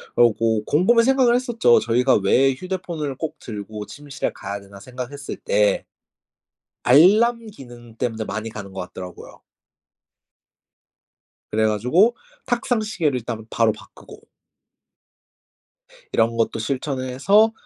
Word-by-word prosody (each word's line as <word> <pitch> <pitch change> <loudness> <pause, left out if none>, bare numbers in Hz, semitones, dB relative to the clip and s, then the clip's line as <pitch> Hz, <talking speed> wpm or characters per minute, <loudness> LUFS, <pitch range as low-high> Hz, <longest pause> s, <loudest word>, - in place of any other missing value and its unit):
그러고 115 -2 +3
곰곰이 215 +10 +4
생각을 260 -1 +4
했었죠. 235 - +3
저희가 125 +3 +2
'왜 130 +7 +3
휴대폰을 170 -3 -5
꼭 160 +3 -5
들고 105 -1 -7
침실에 145 +2 -5
가야 100 +1 -6
되나?' 100 0 -14
생각했을 130 +3 -7
때 - - +1 1.0
알람 220 - +5
기능 120 - -13
때문에 115 -2 -3
많이 110 +2 -4
가는 100 -3 -9
것 95 - -5
같더라고요. 90 0 -10 2.1
그래 110 0 +2
가지고 125 - +3 0.3
탁상 240 -1 0
시계를 165 -11 -1
일단 115 -2 -6
바로 115 -1 +2
바꾸고 110 - -14 1.9
이런 115 +1 +2
것도 115 0 0
실천을 130 +2 -3
해서 200 - +4
130 Hz, 265 characters per minute, -22 LUFS, -, 2.1 s, 알람